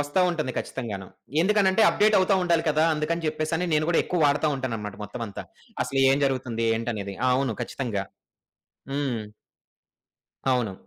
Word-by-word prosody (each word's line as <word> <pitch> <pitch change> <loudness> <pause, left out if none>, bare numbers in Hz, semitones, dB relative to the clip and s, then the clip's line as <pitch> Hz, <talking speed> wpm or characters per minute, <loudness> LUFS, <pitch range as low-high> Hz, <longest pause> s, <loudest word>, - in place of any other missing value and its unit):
ఒస్తా 145 +5 0
ఉంటుంది 155 -7 -2
ఖచ్చితంగాను. 105 -7 -5 0.3
ఎందుకనంటే, 200 +2 +3
అప్‌డేట్ 210 0 +3
అవుతా 190 +1 +3
ఉండాలి 170 -2 +2
కదా! 155 +1 +3
అందుకని 165 +2 -2
జెప్పేసని 155 +3 -1
నేను 155 0 +2
గూడా 175 - +4
ఎక్కువ 180 - -1
వాడతా 145 +2 +2
ఉంటానన్నమాట 115 -6 -4
మొత్తమంతా. 105 0 -6 0.4
అసలు 135 +2 -1
ఎం 140 - +2
జరుగుతుంది? 130 -4 -1
ఏంటనేది? 110 -4 -4 0.2
అవును. 125 -2 +1
ఖచ్చితంగా! 115 -5 -3 0.9
హ్మ్. 135 -5 -1 1.3
అవును. 120 -6 0
140 Hz, 135 wpm, -25 LUFS, 115-165 Hz, 1.3 s, గూడా